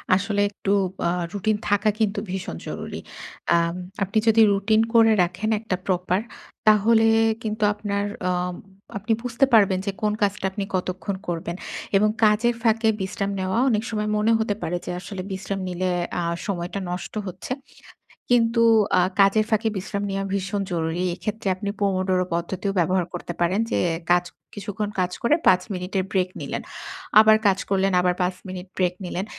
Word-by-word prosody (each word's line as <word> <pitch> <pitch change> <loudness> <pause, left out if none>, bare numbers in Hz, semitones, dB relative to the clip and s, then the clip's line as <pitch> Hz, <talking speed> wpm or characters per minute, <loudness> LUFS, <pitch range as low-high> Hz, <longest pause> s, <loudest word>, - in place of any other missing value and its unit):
আসলে 200 +1 0
একটু 200 -1 -3 0.3
ব - - -34
আ - - +2 0.2
routine 210 +1 0
থাকা 205 +1 +3
কিন্তু 205 -2 +1
ভীষণ 185 - -4
জরুরি। - - -5 0.6
আম 170 0 +1 0.3
আপনি 200 +3 -2
যদি 225 0 +6
routine 215 +3 +3
করে 225 -1 +6
রাখেন 185 +5 -2
একটা 220 -4 -2
proper, 180 0 +1 0.5
তাহলে 220 +2 +5 0.4
কিন্তু 215 0 -2
আপনার 205 -1 -2 0.3
আম 180 0 -1 0.4
আপনি 215 +3 0
বুঝতে 245 +2 +2
পারবেন 195 -4 +5
যে, 200 - 0
কোন 210 0 +2
কাজটা 200 -1 0
আপনি 200 +1 -3
কতক্ষণ 185 +2 -2
করবেন? 170 0 -3 0.4
এবং 210 +1 +3
কাজের 225 +3 +4
ফাঁকে 225 -1 +3
বিশ্রাম 200 +1 -2
নেওয়া 190 +3 -1
অনেক 215 -1 +1
সময় 210 -1 -2
মনে 215 +2 +2
হতে 215 -2 0
পারে 175 +2 -1
যে, - - -3
আসলে 195 0 -6
বিশ্রাম 195 +1 -4
নিলে 185 +1 -1 0.3
আ - - -1 0.2
সময়টা 180 0 -3
নষ্ট 180 0 -5
হচ্ছে 185 +6 -8 0.8
কিন্তু 230 -1 +3 0.4
আ - - +5 0.2
কাজের 200 +2 +5
ফাঁকে 220 0 +2
বিশ্রাম 200 +1 -3
নেওয়া 195 0 -2
ভীষণ 200 +1 -1
জরুরি। 165 +1 -1
এক্ষেত্রে 205 +4 -4
আপনি 200 +1 -4
Pomodoro 185 -2 +1
পদ্ধতিও 190 +4 -2
ব্যবহার 180 +1 +2
করতে 175 0 -5
পারেন 175 +4 +2
যে, - - +1 0.3
কাজ 175 0 +5 0.3
কিছুক্ষণ 205 +1 -4
কাজ 180 0 +1
করে 250 +6 +4
৫ 185 0 +6
মিনিটের 185 +1 -2
break 185 -2 +1
নিলেন। - - -4 0.6
আবার 220 0 +7
কাজ 195 -1 +3
করলেন, 195 0 +2
আবার 180 0 +2
৫ 180 0 0
মিনিট 185 0 -7
break 180 -1 +2
নিলেন। 180 +2 -3
195 Hz, 165 wpm, -24 LUFS, 185-215 Hz, 0.8 s, আবার